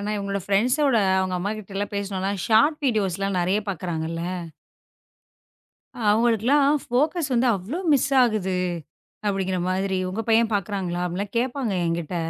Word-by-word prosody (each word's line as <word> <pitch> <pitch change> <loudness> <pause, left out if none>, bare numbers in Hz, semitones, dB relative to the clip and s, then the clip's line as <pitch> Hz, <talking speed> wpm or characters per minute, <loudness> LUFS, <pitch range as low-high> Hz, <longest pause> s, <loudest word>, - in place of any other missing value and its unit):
ஆனா, 210 +1 -3
இவங்களோட 200 0 -3
ப்ரெண்ட்ஸ் 240 +8 +2
ஓட 240 -5 +3 0.2
அவங்க 185 -1 -1
அம்மாகிட்டலாம் 205 +1 -4
பேசினோலாம் 195 -1 -2
ஷார்ட்ஸ் 290 +8 +3
வீடியோஸ்லாம் 195 -4 0
நிறைய 185 +4 +1
பாக்குறாங்க 165 -3 -3
இல்ல. 165 0 -4 1.9
அவங்களுக்குலாம் 240 +6 +3 0.2
போக்கஸ் 300 +3 +1
வந்து 245 +2 +3
அவ்ளோ 220 - -5
மிஸ் 280 0 +2
ஆகுது, 205 -6 0 0.7
அப்படிங்கிற 190 -2 0
மாதிரி 190 0 0
உங்க 215 +5 -3
பையன் 225 0 +4
பாக்குறாங்களா 185 -3 -2
அப்டின்லாம் 195 +5 -4
கேப்பாங்க 250 -2 -1
என்கிட்ட 170 +1 -2
200 Hz, 125 wpm, -24 LUFS, 185-235 Hz, 1.9 s, பையன்